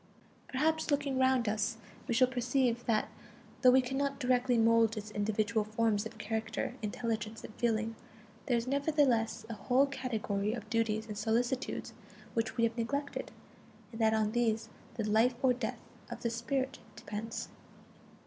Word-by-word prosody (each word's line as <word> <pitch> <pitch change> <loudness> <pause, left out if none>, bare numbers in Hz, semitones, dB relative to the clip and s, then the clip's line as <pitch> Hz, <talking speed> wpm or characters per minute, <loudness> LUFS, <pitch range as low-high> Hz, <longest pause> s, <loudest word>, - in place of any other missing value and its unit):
Perhaps, 315 +5 0
looking 285 -2 +1
around 260 -3 +3
us, 215 +2 0 0.3
we 235 - 0
shall 255 +1 +6
perceive 245 -1 0
that 220 -2 +2 0.5
though 255 - +8
we 260 +1 +6
cannot 275 +2 -1
directly 250 -1 +2
mold 225 0 +4
its 210 0 -6
individual 215 +1 0
forms 215 0 0
of 220 - -14
character, 220 +2 -2
intelligence, 220 +1 -3
and - - -9
feeling, 225 -1 0 0.5
there 245 - +3
is 230 - -1
nevertheless 275 -6 +2
a 230 - -5
whole 250 +6 +3
category 220 -6 -2
of 225 -3 -6
duties 225 -2 +1
and 210 -2 -6
solicitudes 240 +4 -1 0.4
which 225 -1 -1
we 230 - +2
have 230 0 +2
neglected: 280 +5 -2 0.6
and 225 0 -6
that 220 0 +4
on 215 -1 +1
these 225 -1 +1 0.3
the 220 -2 -2
life 225 +4 +4
or 260 -1 +5
death 250 - -3 0.3
of - - -7
the 235 - 0
spirit 260 +3 -2 0.2
depends. 215 +2 -5
230 Hz, 155 wpm, -32 LUFS, 220-255 Hz, 0.6 s, though